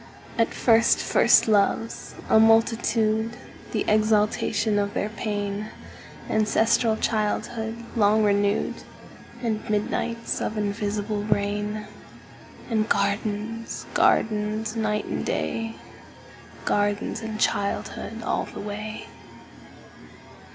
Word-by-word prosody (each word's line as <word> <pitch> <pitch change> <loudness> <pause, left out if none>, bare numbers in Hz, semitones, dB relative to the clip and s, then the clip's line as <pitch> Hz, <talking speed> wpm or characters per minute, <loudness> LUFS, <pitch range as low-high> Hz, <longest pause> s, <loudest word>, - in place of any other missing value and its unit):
And 230 - +2
first 230 -1 +4
first - - +4
loves, 215 +1 +1
a 220 - +5
multitude, 225 0 +3 0.3
The - - -1
exaltation 215 0 +2
of 200 0 -2
their 210 - -1
pain; 210 -1 -3 0.6
Ancestral 220 +1 +2
childhood 225 +1 -2
long 215 0 +4
renewed; 205 0 +1 0.6
And 220 -2 -2
midnights 230 +2 -1
of 215 - -2
invisible 205 0 -2
rain; 210 +1 -1 0.8
And 220 -2 0
gardens, 210 +3 -1
gardens, 215 +1 +1
night 215 -2 -1
and - - -3
day, 225 0 -2 0.9
Gardens 205 +2 0
and 220 -1 -5
childhood 220 +3 -2
all - - -1
the - - -9
way. 210 +1 -6
215 Hz, 95 wpm, -25 LUFS, 205-225 Hz, 0.9 s, a